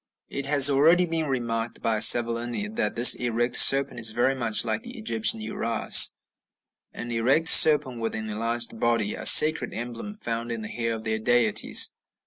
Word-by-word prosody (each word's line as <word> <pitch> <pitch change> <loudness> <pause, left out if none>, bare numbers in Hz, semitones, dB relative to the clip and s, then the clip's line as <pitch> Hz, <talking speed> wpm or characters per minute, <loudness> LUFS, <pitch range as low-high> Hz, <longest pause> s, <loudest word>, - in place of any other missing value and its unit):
It 140 -1 -5
has 140 -1 +3
already 160 +6 +1
been 165 -2 -5
remarked 120 -3 -6
by 110 -1 -2
Savolini 120 - +2
that 240 - -4
this 120 +2 +6
erect 120 0 -3
serpent 135 -2 +4
is 110 -1 0
very 120 +4 -2
much 120 -4 -3
like 110 -2 -4
the 245 +1 -13
Egyptian 225 0 -3
Uræus, 115 - +1 0.8
an 120 0 -10
erect 130 +8 +1
serpent 145 -6 +5
with 115 -1 -5
an 110 0 -7
enlarged 115 +2 -5
body 115 -3 -3
a - - -3
sacred 155 +1 +4
emblem 120 - -9
found 115 - -7
in 115 -1 -6
the 105 - -9
hair 115 -1 -5
of 110 - -11
their 110 0 -4
deities. 110 -2 0
120 Hz, 170 wpm, -22 LUFS, 115-140 Hz, 0.8 s, this